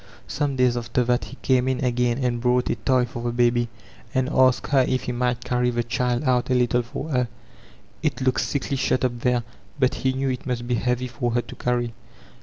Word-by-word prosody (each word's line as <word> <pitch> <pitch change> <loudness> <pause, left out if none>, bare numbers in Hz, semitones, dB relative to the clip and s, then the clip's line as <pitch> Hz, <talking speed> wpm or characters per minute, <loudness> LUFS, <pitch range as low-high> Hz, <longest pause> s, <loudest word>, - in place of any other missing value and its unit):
Some 145 -1 -1
days 125 -1 +3
after 120 +1 0
that 125 0 +1
he - - -10
came 130 -1 +3
in 130 0 0
again, 120 -1 +1
and 125 -3 -1
brought 125 0 +2
a - - 0
toy 130 -2 +2
for 120 0 -7
the 120 0 -1
baby, 120 0 +2 0.5
and 130 0 +1
asked 130 +1 +3
her 135 -2 +5
if 130 - 0
he - - -2
might 125 0 -1
carry 125 -1 +1
the 120 -1 0
child 125 +2 0
out 125 -3 +1
a 130 - +3
little 125 0 +2
for 125 +6 -6
her; 125 -4 +1 0.7
it 145 -4 -1
looked 130 -1 +1
sickly 140 -1 -2
shut 130 -1 +1
up 120 -1 -2
there, 125 0 +1 0.3
but 130 -2 +2
he 130 0 +2
knew 135 +1 -1
it 130 +1 -4
must 120 -1 -2
be 125 - 0
heavy 125 +2 0
for 120 -1 -2
her 120 - +2
to - - -10
carry. 120 -1 -1
125 Hz, 220 wpm, -24 LUFS, 120-130 Hz, 0.7 s, her